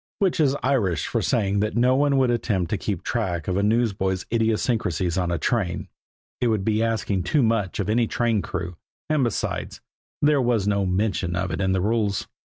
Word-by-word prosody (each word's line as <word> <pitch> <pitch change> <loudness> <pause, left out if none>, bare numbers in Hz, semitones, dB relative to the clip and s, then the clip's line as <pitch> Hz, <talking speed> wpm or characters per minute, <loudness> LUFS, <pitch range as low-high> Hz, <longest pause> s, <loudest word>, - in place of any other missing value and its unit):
Which 185 -3 +1
is 145 -2 +3
Irish 115 - +1
for - - -1
saying 100 -3 +1
that 105 +3 -1
no 125 +2 +4
one 140 0 +2
would 130 -2 +3
attempt 100 -7 -1
to 105 - +1
keep 100 -6 -3
track 90 -9 -2
of 90 - 0
a 100 - +1
newsboy's 100 -4 0
idiosyncrasies 110 -6 0
on 90 -2 0
a 85 - 0
train; 95 0 -1 0.5
it 125 - +1
would 110 -4 0
be 110 0 +1
asking 110 -4 0
too 130 - +1
much 110 -5 0
of 100 - -1
any 115 +2 +2
train 115 -3 0
crew; 90 -2 -5 0.3
and, 150 -3 +2
besides, 120 -3 -2 0.4
there 145 -1 +3
was 120 -5 +1
no 100 -2 +1
mention 90 -2 0
of 95 0 -2
it 80 - -2
in 95 -1 +1
the 95 - +1
rules. 105 -1 0
105 Hz, 195 wpm, -24 LUFS, 95-120 Hz, 0.5 s, no